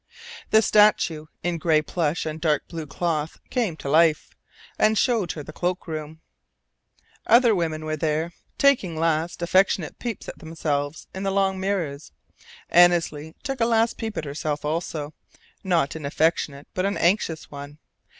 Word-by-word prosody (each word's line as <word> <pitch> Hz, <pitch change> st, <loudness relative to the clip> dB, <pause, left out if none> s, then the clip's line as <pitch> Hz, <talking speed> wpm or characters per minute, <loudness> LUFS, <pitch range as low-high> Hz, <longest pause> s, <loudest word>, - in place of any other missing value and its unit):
The 220 Hz, +1 st, +5 dB
statue 190 Hz, -7 st, +3 dB, 0.2 s
in 175 Hz, -1 st, -1 dB
gray 155 Hz, -2 st, +3 dB
plush 165 Hz, 0 st, -1 dB
and 155 Hz, 0 st, -5 dB
dark 150 Hz, -3 st, +1 dB
blue 165 Hz, -3 st, -6 dB
cloth 155 Hz, +1 st, -2 dB
came 220 Hz, -11 st, -1 dB
to -, -, -7 dB
life, 155 Hz, +2 st, +3 dB, 0.4 s
and 215 Hz, 0 st, +4 dB
showed 230 Hz, -7 st, +1 dB
her 150 Hz, -, -7 dB
the 155 Hz, -, -10 dB
cloak 180 Hz, +2 st, -2 dB
room. 155 Hz, 0 st, -6 dB, 1.1 s
Other 235 Hz, 0 st, +6 dB
women 160 Hz, -4 st, -2 dB
were 155 Hz, 0 st, -2 dB
there, 160 Hz, +2 st, -1 dB, 0.3 s
taking 245 Hz, -12 st, +3 dB
last, 165 Hz, +1 st, 0 dB
affectionate 185 Hz, -1 st, +2 dB
peeps 235 Hz, -4 st, -5 dB
at -, -, -8 dB
themselves 155 Hz, -2 st, -3 dB
in 190 Hz, -, -5 dB
the 195 Hz, -, 0 dB
long 195 Hz, -1 st, +1 dB
mirrors. 175 Hz, -7 st, -3 dB, 0.6 s
Annesley 170 Hz, -3 st, +3 dB
took 270 Hz, -3 st, -3 dB
a -, -, +5 dB
last 230 Hz, 0 st, +2 dB
peep 220 Hz, -2 st, -4 dB
at 155 Hz, -, -3 dB
herself 150 Hz, +1 st, -3 dB
also, 155 Hz, -1 st, -3 dB, 0.5 s
not 170 Hz, -6 st, +1 dB
an 160 Hz, -, -7 dB
affectionate 150 Hz, -2 st, 0 dB
but 185 Hz, +1 st, 0 dB
an 200 Hz, -, -2 dB
anxious 170 Hz, -3 st, 0 dB
one. 145 Hz, +1 st, -9 dB
165 Hz, 155 wpm, -24 LUFS, 155-190 Hz, 1.1 s, Other